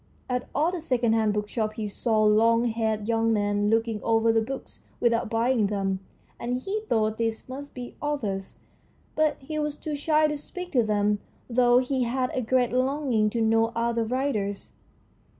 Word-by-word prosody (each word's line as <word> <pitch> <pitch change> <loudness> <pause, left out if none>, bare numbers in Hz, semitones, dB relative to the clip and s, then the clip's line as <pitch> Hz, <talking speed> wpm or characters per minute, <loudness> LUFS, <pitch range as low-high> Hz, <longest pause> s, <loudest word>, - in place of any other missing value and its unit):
At 250 -1 -2
all 310 +4 +2
the 360 -2 -4
second 245 -6 +1
hand 220 -1 +2
bookshops 215 +1 -2
he 220 - -2
saw 215 +1 0
long 230 +2 +4
haired 220 -2 -1
young 225 0 +2
men 205 -1 +1
looking 225 -1 +1
over 225 0 +3
the 225 - +3
books 265 +4 -6 0.2
without 235 -2 +1
buying 230 -1 +2
them, 195 -2 -1 0.4
and 245 +1 -2
he 395 +10 -3
thought 220 -1 +1
these 225 -1 -2
must 280 +2 -8
be 245 -1 -7
authors, 215 -10 -3 0.6
but 310 -1 +2
he 305 +3 -5
was 300 -1 -1
too 305 0 -5
shy 305 +1 +2
to 300 0 0
speak 360 +5 -7
to 250 - +4
them, 210 -1 +1 0.3
though 245 0 +4
he 260 +1 +1
had 255 +1 -1
a 255 - 0
great 250 +1 +1
longing 255 -4 +1
to 230 +2 -2
know 225 +1 +3
other 235 0 0
writers. 220 -5 -2
230 Hz, 175 wpm, -26 LUFS, 220-260 Hz, 0.6 s, long